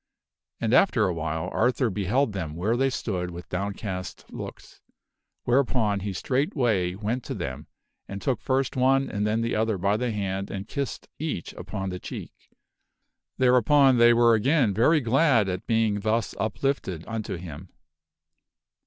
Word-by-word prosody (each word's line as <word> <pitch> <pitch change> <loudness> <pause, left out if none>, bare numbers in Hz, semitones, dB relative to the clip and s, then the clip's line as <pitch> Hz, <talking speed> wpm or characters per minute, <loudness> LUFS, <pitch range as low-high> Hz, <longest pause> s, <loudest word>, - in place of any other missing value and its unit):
And, 115 0 0
after 125 - +4
awhile, 80 0 -3
Arthur' 125 0 +2
beheld 105 +5 0
them 80 -6 -4
where 100 +7 0
they 135 +2 +2
stood 95 -8 -3
with 85 0 -9
downcast 95 - -5
looks, - - -9 0.6
whereupon 120 -5 +2
he 100 +1 -3
straight 130 +9 -1
way 100 -10 +1
went 110 +5 -2
to - - -4
them - - -5 0.4
and 100 - -6
took 125 +5 -1
first 130 -1 0
one 135 +1 +3
and 105 0 -1
then 110 +2 +1
the 115 +1 -1
other 110 -1 +1
by 100 +3 +1
the 125 +1 -1
hand 100 -2 -3
and 100 +1 -5
kissed 140 -1 -4
each 150 - -4
upon 95 +1 -5
the 90 - -5
cheek. - - -7 1.0
Thereupon 130 +1 +5
they 120 0 +7
were 120 0 +5
again 125 0 +3
very 150 - +4
glad 125 -3 +3
at 90 -1 -4
being 110 -3 +2
thus 110 +2 0
uplifted 110 - -2
unto 110 -3 -4
him. 85 0 -9
110 Hz, 155 wpm, -26 LUFS, 95-125 Hz, 1.0 s, they